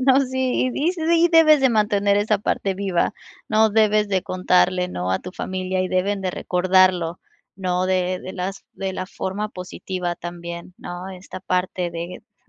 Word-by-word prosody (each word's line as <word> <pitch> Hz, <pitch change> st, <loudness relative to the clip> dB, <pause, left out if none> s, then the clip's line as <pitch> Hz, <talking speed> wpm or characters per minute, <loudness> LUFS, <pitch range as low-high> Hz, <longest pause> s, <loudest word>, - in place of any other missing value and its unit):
No, 265 Hz, 0 st, +6 dB
sí, 260 Hz, -1 st, 0 dB
y 325 Hz, +5 st, +1 dB
sí 335 Hz, 0 st, +3 dB
debes 310 Hz, -3 st, +7 dB
de 265 Hz, -, +5 dB
mantener 205 Hz, -2 st, +2 dB
esa 210 Hz, 0 st, +2 dB
parte 195 Hz, -1 st, -1 dB
viva, 190 Hz, -3 st, 0 dB, 0.4 s
¿no?, 220 Hz, +1 st, +4 dB
debes 215 Hz, 0 st, +3 dB
de 190 Hz, -2 st, +1 dB
contarle, 180 Hz, 0 st, +2 dB
¿no?, 90 Hz, -, -3 dB
a 95 Hz, -, +1 dB
tu 180 Hz, -, -9 dB
familia 185 Hz, 0 st, -3 dB
y 185 Hz, -, -1 dB
deben 195 Hz, +2 st, 0 dB
de 185 Hz, -1 st, -1 dB
recordarlo, 180 Hz, -1 st, +2 dB, 0.4 s
¿no?, 185 Hz, -1 st, 0 dB
de 185 Hz, -1 st, 0 dB
de 185 Hz, -, -7 dB
las 190 Hz, +1 st, -5 dB
de 195 Hz, -1 st, -4 dB
la 185 Hz, 0 st, -4 dB
forma 200 Hz, +3 st, -4 dB
positiva 180 Hz, -1 st, -5 dB
también, 170 Hz, 0 st, -7 dB
¿no?, 175 Hz, +1 st, -7 dB
esta 185 Hz, 0 st, -9 dB
parte 180 Hz, -1 st, -1 dB
de 170 Hz, +1 st, -6 dB, 0.2 s
de -, -, -41 dB
185 Hz, 175 wpm, -22 LUFS, 180-210 Hz, 0.4 s, debes